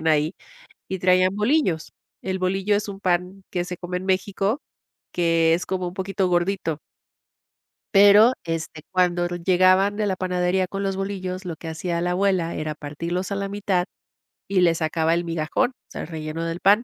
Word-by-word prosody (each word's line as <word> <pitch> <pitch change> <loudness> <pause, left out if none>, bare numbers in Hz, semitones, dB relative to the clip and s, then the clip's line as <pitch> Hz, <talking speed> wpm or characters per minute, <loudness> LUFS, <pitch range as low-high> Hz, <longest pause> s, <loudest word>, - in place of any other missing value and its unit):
vivían 160 - -5
ahí 155 +2 +2 0.5
y 190 - -3
traían 185 +1 +3
bolillos. 210 - +1 0.3
El 190 0 -2
bolillo 195 +2 +1
es 205 0 -3
un 195 - -6
pan 180 +1 -1
que 175 -1 -1
se 180 0 -6
come 180 +1 -5
en 185 - -8
México, 195 +4 0 0.5
que 165 -1 +3
es 180 +2 -2
como 185 -2 -2
un 175 - -9
poquito 190 0 -1
gordito. 175 -3 0 1.2
Pero, 205 +4 +7
este, 165 -2 -4
cuando 180 -1 +2
llegaban 185 +3 +3
de 210 0 0
la 190 - 0
panadería 180 0 0
con 195 +2 -4
los 195 -1 -1
bolillos, 190 -1 -4
lo 170 -3 -4
que 165 - -10
hacía 170 +1 -2
la 175 +1 0
abuela 185 -2 +1
era 155 0 -3
partirlos 170 +6 -4
a 200 - 0
la 200 0 -2
mitad 195 -3 0 0.6
y 195 -2 +2
le 170 -2 +4
sacaba 160 0 +1
el 170 - 0
migajón, 165 +7 0
o - - -31 0.2
sea, - - -5
relleno 160 0 -5
del 165 +1 -3
pan. 205 +5 +4
180 Hz, 180 wpm, -23 LUFS, 170-195 Hz, 1.2 s, Pero